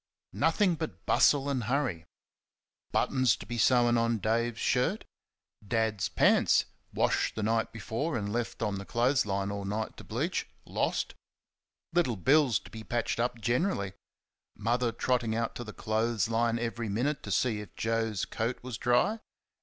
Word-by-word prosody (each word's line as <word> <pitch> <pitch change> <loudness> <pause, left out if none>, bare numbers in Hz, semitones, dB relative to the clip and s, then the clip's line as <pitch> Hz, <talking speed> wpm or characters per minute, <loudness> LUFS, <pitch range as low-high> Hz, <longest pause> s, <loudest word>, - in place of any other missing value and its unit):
Nothing 200 -5 +2
but 160 -1 -6
bustle 145 -1 +4
and 130 -5 -1
hurry. 120 - -1 0.9
Buttons 130 -6 +2
to - - -10
be 120 +3 -4
sewn 120 -1 +4
on 115 0 +1
Dave's 115 +2 0
shirt; 160 - +1 0.6
Dad's 110 -3 0
pants - - +4 0.3
washed - - +1
the 110 - -2
night 115 +1 +1
before 115 - -3
and 105 -1 -3
left 120 -1 -2
on 100 -2 -1
the 100 - -7
clothes 125 +2 +2
line 100 0 -1
all 100 0 -4
night 105 +2 -3
to - - -10
bleach - - -2 0.2
lost; - - -1 0.8
Little 165 -9 +2
Bill's 135 - +4
to - - -14
be 110 -1 -8
patched 120 0 -2
up 120 0 0
generally; 120 - 0 0.6
Mother 120 +3 0
trotting 120 -1 0
out 115 0 -1
to 120 - -6
the 110 - -8
clothes 110 -1 0
line 115 0 +1
every 115 -1 -3
minute 125 +8 -1
to - - -8
see 105 +2 +1
if 100 -5 -12
Joe's 115 -3 -1
coat 115 +3 -2
was 125 -3 -6
dry. 125 - +2
115 Hz, 160 wpm, -30 LUFS, 110-125 Hz, 0.9 s, bustle